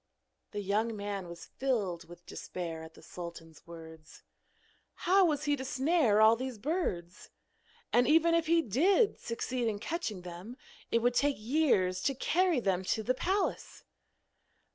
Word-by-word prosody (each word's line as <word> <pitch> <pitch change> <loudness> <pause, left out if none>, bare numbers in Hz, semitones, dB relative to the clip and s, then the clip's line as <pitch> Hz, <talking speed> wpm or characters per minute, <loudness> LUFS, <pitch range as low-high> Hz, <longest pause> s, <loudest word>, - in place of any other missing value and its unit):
The 205 - -4
young 215 +3 0
man 200 -2 -4
was 170 0 -9
filled 195 -11 -2
with 175 0 -13
despair 165 -3 -6
at 160 0 -11
the - - -16
sultan's 170 -3 -10
words. 160 -2 -12 0.8
How 385 +2 +5
was 300 -3 0
he 290 -1 +2
to 265 - -6
snare 265 -4 +2
all 220 +1 +7
these 255 0 -5
birds? 205 - -3 0.6
and 245 - +4
even 330 +2 +4
if 335 -1 +2
he 335 0 +4
did 375 - +2
succeed 240 +1 -3
in 215 -2 -1
catching 215 - -4
them 180 +8 -9 0.3
it 230 0 +1
would 245 0 +3
take 285 +3 +2
years 215 -7 +1
to 275 - 0
carry 350 +3 +2
them 190 -5 0
to 220 - 0
the 255 - +1
palace! 380 +9 -2
230 Hz, 155 wpm, -31 LUFS, 180-290 Hz, 0.8 s, all